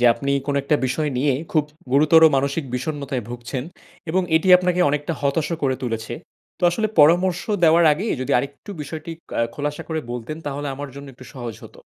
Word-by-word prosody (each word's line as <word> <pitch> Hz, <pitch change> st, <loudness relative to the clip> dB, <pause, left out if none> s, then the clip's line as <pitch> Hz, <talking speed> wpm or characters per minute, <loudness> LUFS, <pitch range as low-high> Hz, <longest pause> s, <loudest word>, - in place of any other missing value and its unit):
যে 125 Hz, -, +2 dB
আপনি 140 Hz, 0 st, -3 dB, 0.2 s
কোনো 140 Hz, -1 st, 0 dB
একটা 145 Hz, +2 st, +2 dB
বিষয় 150 Hz, +4 st, -1 dB
নিয়ে 140 Hz, 0 st, +2 dB, 0.2 s
খুব 155 Hz, -3 st, +3 dB, 0.3 s
গুরুতর 155 Hz, +3 st, +6 dB
মানসিক 140 Hz, +3 st, 0 dB
বিষণ্ণতায় 140 Hz, -1 st, -3 dB
ভুগছেন 120 Hz, +2 st, -5 dB, 0.5 s
এবং 185 Hz, +2 st, +2 dB
এটি 165 Hz, +4 st, 0 dB
আপনাকে 180 Hz, 0 st, 0 dB
অনেকটা 150 Hz, +3 st, -1 dB
হতাশও 150 Hz, +4 st, 0 dB
করে 130 Hz, -2 st, +1 dB
তুলেছে। 115 Hz, -2 st, -3 dB, 0.5 s
তো -, -, -23 dB
আসলে 215 Hz, +5 st, 0 dB
পরামর্শ 175 Hz, +4 st, +5 dB, 0.2 s
দেওয়ার 165 Hz, +1 st, +5 dB
আগেই 200 Hz, +9 st, -1 dB
যদি 130 Hz, -, -2 dB
আরেকটু 140 Hz, -, -6 dB
বিষয়টি 155 Hz, +3 st, -7 dB, 0.2 s
অ্যা -, -, 0 dB
খোলাসা 145 Hz, 0 st, -3 dB
করে 160 Hz, -1 st, -2 dB
বলতেন, 125 Hz, +5 st, -5 dB
তাহলে 145 Hz, 0 st, -3 dB
আমার 145 Hz, +1 st, -6 dB
জন্য 140 Hz, 0 st, -9 dB
একটু 130 Hz, +1 st, -14 dB
সহজ 120 Hz, -4 st, -6 dB
হতো। -, -, -14 dB
145 Hz, 180 wpm, -22 LUFS, 135-160 Hz, 0.5 s, গুরুতর